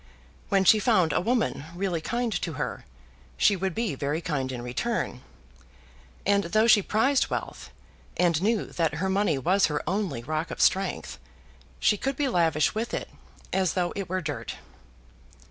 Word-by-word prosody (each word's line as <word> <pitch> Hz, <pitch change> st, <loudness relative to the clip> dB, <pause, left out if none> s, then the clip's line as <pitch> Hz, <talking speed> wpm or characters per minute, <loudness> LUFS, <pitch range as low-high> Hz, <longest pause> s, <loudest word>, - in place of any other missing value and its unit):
When 195 Hz, -2 st, +3 dB
she 215 Hz, +3 st, +7 dB
found 185 Hz, -8 st, +3 dB
a -, -, +2 dB
woman 225 Hz, -, 0 dB
really 180 Hz, -3 st, -1 dB
kind 235 Hz, +4 st, -1 dB
to 165 Hz, -, -2 dB
her, -, -, -4 dB, 0.5 s
she 200 Hz, -, +4 dB
would 190 Hz, -1 st, -2 dB
be 230 Hz, -6 st, -1 dB
very 140 Hz, +3 st, -2 dB
kind 150 Hz, -7 st, -2 dB
in 120 Hz, -2 st, -5 dB
return. 125 Hz, -, -2 dB, 1.0 s
And 200 Hz, 0 st, +3 dB
though 215 Hz, +6 st, +3 dB
she 220 Hz, -3 st, +6 dB
prized 255 Hz, +8 st, +2 dB
wealth, -, -, -5 dB, 0.5 s
and 170 Hz, -3 st, +2 dB
knew 215 Hz, +1 st, +1 dB
that 165 Hz, -2 st, 0 dB
her 190 Hz, +5 st, -1 dB
money 195 Hz, -6 st, +2 dB
was 185 Hz, +8 st, +3 dB
her 150 Hz, -1 st, -3 dB
only 180 Hz, -, -1 dB
rock 155 Hz, +4 st, -2 dB
of -, -, -7 dB
strength, 195 Hz, +1 st, +1 dB, 0.6 s
she 210 Hz, -, +3 dB
could 270 Hz, +6 st, -2 dB
be 285 Hz, +1 st, 0 dB
lavish 165 Hz, -, +2 dB
with 225 Hz, +2 st, -2 dB
it, -, -, -5 dB, 0.4 s
as 190 Hz, -3 st, +1 dB
though 180 Hz, -2 st, 0 dB
it 195 Hz, -4 st, -4 dB
were 185 Hz, 0 st, -1 dB
dirt. 150 Hz, -3 st, -5 dB
185 Hz, 165 wpm, -27 LUFS, 160-215 Hz, 1.0 s, she